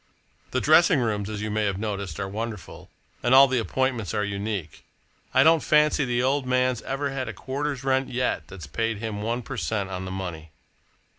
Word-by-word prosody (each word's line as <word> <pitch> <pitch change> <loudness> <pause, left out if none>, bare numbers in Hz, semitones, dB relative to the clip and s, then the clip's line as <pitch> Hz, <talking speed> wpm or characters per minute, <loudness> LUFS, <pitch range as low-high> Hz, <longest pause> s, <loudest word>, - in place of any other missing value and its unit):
The 130 - 0
dressing 160 +2 +5
rooms, 105 -4 -1
as 105 -1 -4
you 110 - -3
may 110 0 0
have 100 -2 -1
noticed, 100 -5 -4
are 95 - -2
wonderful, 110 0 -6 0.3
and 125 +2 +4
all 135 +1 +9
the 130 -1 +1
appointments 120 -2 -1
are 105 - +1
unique. 100 -4 -4 0.5
I 130 +1 +5
don't 160 +1 +5
fancy 150 -1 +3
the 120 0 0
old 135 0 +1
man's 125 -1 +1
ever 135 +1 -3
had 135 -1 -3
a - - -5
quarter's 140 0 -4
rent 135 0 +1
yet 125 -10 -1
that's 90 -5 -9
paid 115 +9 -2
him 105 -1 -4
one 120 +3 -2
per 135 +2 -6
cent, 95 +2 -2
on 95 0 -4
the - - -5
money. 85 -4 -6
115 Hz, 200 wpm, -25 LUFS, 100-130 Hz, 0.5 s, all